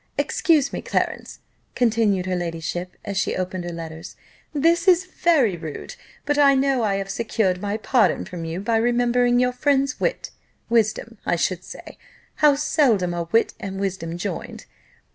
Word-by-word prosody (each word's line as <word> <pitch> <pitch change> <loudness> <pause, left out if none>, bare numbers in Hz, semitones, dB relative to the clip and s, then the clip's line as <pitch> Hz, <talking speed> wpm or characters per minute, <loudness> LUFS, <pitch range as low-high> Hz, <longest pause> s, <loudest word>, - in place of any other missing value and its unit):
Excuse 300 -5 +2
me, - - -3
Clarence," - - -3 0.3
continued 220 -6 +2
her 185 -1 -1
ladyship, 175 +1 -4
as 200 -1 -4
she - - -1
opened 185 -1 -3
her 175 - -4
letters, 165 +1 -8 0.4
"this 335 +5 +2
is 370 0 +5
very 315 - +2
rude: 160 -3 -7 0.3
but 290 0 +1
I 280 -1 +6
know 270 -1 +2
I 205 -3 +1
have 195 0 -3
secured 195 -3 -1
my 205 +1 -2
pardon 235 +2 +2
from 175 -2 -7
you 165 +3 -4
by 225 +2 +1
remembering 245 +1 +2
your 250 0 +2
friend's 275 +1 +1
wit - - -2 0.4
wisdom, 225 -1 0
I - - +1
should 180 +1 -1
say: - - -11 0.4
how 295 -2 +5
seldom 255 - +2
are 170 -1 -4
wit 230 - +3
and 195 0 -5
wisdom 180 -4 -3
joined! 180 -1 -5
215 Hz, 160 wpm, -23 LUFS, 180-265 Hz, 0.4 s, I